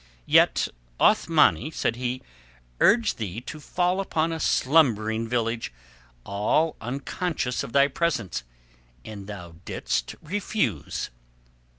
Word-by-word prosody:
"Yet - - +4 0.3
Othmani," 115 - +4
said 120 -7 -1
he, 125 +1 -3 0.6
"urged 230 - +4
thee 105 -1 -3
to 155 +5 -8
fall 180 +4 0
upon 165 -4 0
a 165 - -3
slumbering 115 -8 +2
village 115 -1 -1 0.5
all 105 - +1
unconscious 135 +2 -2
of - - -6
thy 140 +2 +5
presence, 120 - -1 0.6
and 100 -3 -8
thou 90 -5 -9
didst - - -2
refuse." 160 - -2
125 Hz, 105 wpm, -26 LUFS, 110-160 Hz, 0.6 s, thy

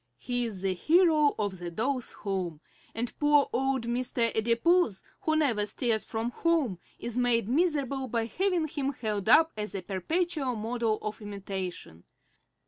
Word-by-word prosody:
He 245 -1 -1
is 200 -5 -5
the 190 -1 +1
hero 310 - +4
of 200 -4 -2
the 175 -1 -5
dolls' 250 +8 -2
home, 185 -6 -3 0.4
and 230 +1 -3
poor 295 -1 +4
old 270 -1 +1
Mr. 240 -1 0
Adipose, 235 - +2 0.2
who 315 - 0
never 260 -9 +2
stirs 220 0 0
from 225 +2 -3
home, 295 - +1 0.2
is 235 -1 -6
made 235 -3 +2
miserable 275 -2 +1
by 230 -1 0
having 360 - 0
him 280 -2 -2
held 215 -4 -2
up 320 +5 +6
as 210 -1 -5
a 190 - -4
perpetual 280 - -1
model 220 -1 -1
for 215 - -15
imitation. 190 - -6
235 Hz, 150 wpm, -29 LUFS, 210-290 Hz, 0.4 s, up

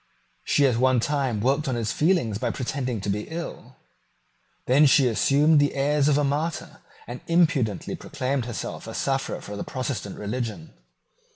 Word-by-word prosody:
She 145 - +3
at 125 -4 +2
one 130 0 +3
time 130 -4 -1
worked 140 +5 +1
on 130 - 0
his 115 -2 -1
feelings 150 - +1
by 125 - -1
pretending 125 -3 -3
to 100 - -4
be 105 +2 -3
ill. 170 +1 -7 0.9
Then 145 +4 +5
she 135 -2 +5
assumed 145 +6 +3
the 145 0 +1
airs 145 +1 +2
of 145 -1 +3
a 145 - +2
martyr, 150 +4 -2 0.3
and 120 +2 -8
impudently 155 - +1
proclaimed 130 -1 -3
herself 120 -2 -6
a - - -7
sufferer 135 -1 -2
for 105 - -8
the 100 - -4
Protestant 130 -6 -4
religion. 105 -5 -5
135 Hz, 165 wpm, -25 LUFS, 115-145 Hz, 0.9 s, Then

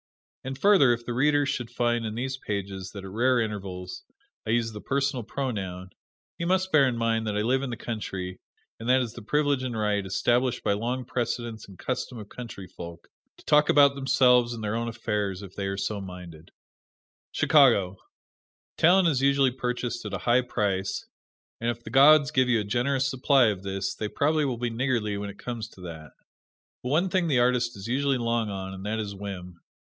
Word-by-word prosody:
And 130 0 -5
further, 150 -8 +5
if 120 0 -5
the 120 - -3
Reader 145 +3 +3
should 120 -4 -3
find 120 -1 0
in 110 - -5
these 130 +3 -2
pages 100 -5 -5
that, 100 -2 -7
at 95 - -8
rare 125 +4 +2
intervals, 95 -5 -4 0.5
I - - -3
use 115 0 +1
the 105 -1 -8
personal 140 -2 -1
pronoun, 100 -7 -4 0.5
he - - -2
must 185 +2 +1
bear 140 -4 +5
in 120 -2 -1
mind 115 -1 0
that 105 -1 -1
I - - +1
live 130 +4 +2
in 135 - -3
the 120 - -5
country, 95 -5 -5 0.4
and 115 +2 -4
that 130 +1 +5
it - - +1
is 115 - -6
the - - -9
privilege 145 +3 +1
and 125 -3 -3
right, 105 -1 0
established 120 +6 +1
by - - +2
long 120 +5 -2
precedent 115 -2 -3
and 95 -2 -14
custom 130 -1 -4
of 105 -2 -9
country 115 -6 -8
folk, 85 -1 -10 0.3
to - - -19
talk 150 0 +4
about 140 -1 +6
themselves 125 -3 +3
and 110 - -7
their 105 0 -1
own 115 +1 -2
affairs 105 -4 -2
if 95 -2 -10
they 100 -1 -3
are 100 0 -3
so 100 +1 -2
minded. 90 -4 -10 0.8
Chicago: 115 - +4 0.8
Talent 180 +2 +5
is 140 -5 +1
usually 135 -1 +3
purchased 125 -1 -3
at - - -4
a - - -7
high 120 +1 +4
price, 100 -6 -2 0.5
and 115 - -1
if 120 0 -4
the - - -9
gods 145 +1 +6
give 130 -3 +2
you 120 -2 +3
a - - -1
generous 130 +5 0
supply 135 -2 +3
of 100 -3 -3
this, 95 0 -3
they 110 - -4
probably 150 +6 +1
will 130 -3 -2
be 120 0 -2
niggardly 115 -3 -1
when 100 0 -4
it 100 - -10
comes 115 -3 -5
to 95 - -16
that. 80 -3 -9 0.7
But 125 - -4
one 170 +7 +2
thing 185 -3 +1
the 140 -5 +2
artist 120 -2 +2
is 100 - -8
usually 135 +3 +1
long 115 -2 0
on, 95 -1 -5
and 95 0 -8
that 110 +1 -1
is 105 -2 -4
whim. 95 -3 -8
120 Hz, 205 wpm, -26 LUFS, 100-130 Hz, 0.8 s, about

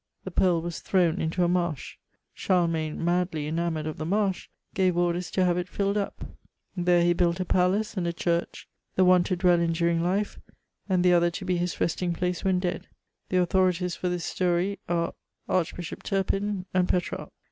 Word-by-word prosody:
The - - -6
pearl 175 -3 +2
was 170 -3 -4
thrown 180 -2 +1
into 165 +3 0
a - - +3
marsh; 175 -5 -1 0.4
Charlemagne, 165 -3 0
madly 175 -3 0
enamoured 160 0 -2
of 155 - -4
the 155 - -3
marsh, 195 0 0 0.2
gave 185 -4 +2
orders 175 0 0
to 185 - +1
have 175 0 +2
it 180 0 -4
filled 200 +1 -1
up; 205 -1 -3 0.5
there 175 -1 +3
he 175 0 +4
built 170 0 +1
a 185 - -1
palace 185 +5 +1
and 180 -3 -1
a - - +1
church: 170 0 -2 0.3
the 185 - +4
one 180 -1 +6
to 185 - 0
dwell 175 -1 +3
in 170 -1 +1
during 170 0 +1
life, 195 +4 -1 0.5
and 185 -2 +2
the 180 - +6
other 175 0 +4
to 190 +3 -6
be 180 -1 +1
his 175 0 -2
resting 175 +1 0
place 180 +1 -2
when 190 -1 +2
dead. 180 -1 -3 0.4
The 185 - +1
authorities 180 -1 +2
for 180 - -2
this 175 -2 -2
story 180 +2 0
are 170 -1 0 0.3
Arch 180 -3 0
bishop 175 -3 -7
Turpin, 195 0 -1
and 180 -1 +2
Petrarch. 180 -1 -1
180 Hz, 190 wpm, -27 LUFS, 170-185 Hz, 0.5 s, one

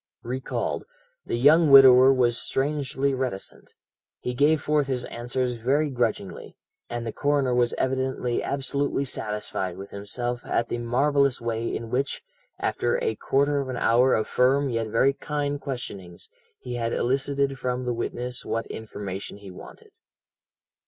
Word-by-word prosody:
"Recalled, 130 +2 -3 0.4
the - - -1
young 150 +5 +5
widower 130 -1 +9
was 125 -3 +2
strangely 140 0 -1
reticent. 130 -7 -5 0.4
He 125 - -3
gave 145 +5 +3
forth 150 -2 +1
his 130 -2 -2
answers 125 +1 -3
very 140 +6 +1
grudgingly, 115 -6 -3 0.3
and 120 0 -4
the 115 - -4
coroner 145 -3 +1
was 120 -1 +2
evidently 130 -2 -1
absolutely 140 0 -1
satisfied 105 -6 -3
with 100 +1 -9
himself 120 +5 -4
at 115 - -1
the 120 - -2
marvellous 140 +3 +2
way 115 -1 -2
in 115 -1 -6
which, 135 +3 -1 0.3
after 480 - 0
a 445 - +1
quarter 140 +1 +1
of 135 -1 -3
an 125 - -3
hour 125 +3 +4
of 110 - -1
firm 135 +2 +2
yet 115 -1 -1
very 125 +5 +3
kind 145 0 -3
questionings, 100 -10 -7 0.3
he 120 -1 -6
had 115 -1 -1
elicited 135 +1 0
from 125 0 -2
the 125 - 0
witness 125 +1 -4
what 115 0 -2
information 100 -3 -7
he 100 -2 -11
wanted. 90 - -13
125 Hz, 145 wpm, -25 LUFS, 115-140 Hz, 0.4 s, widower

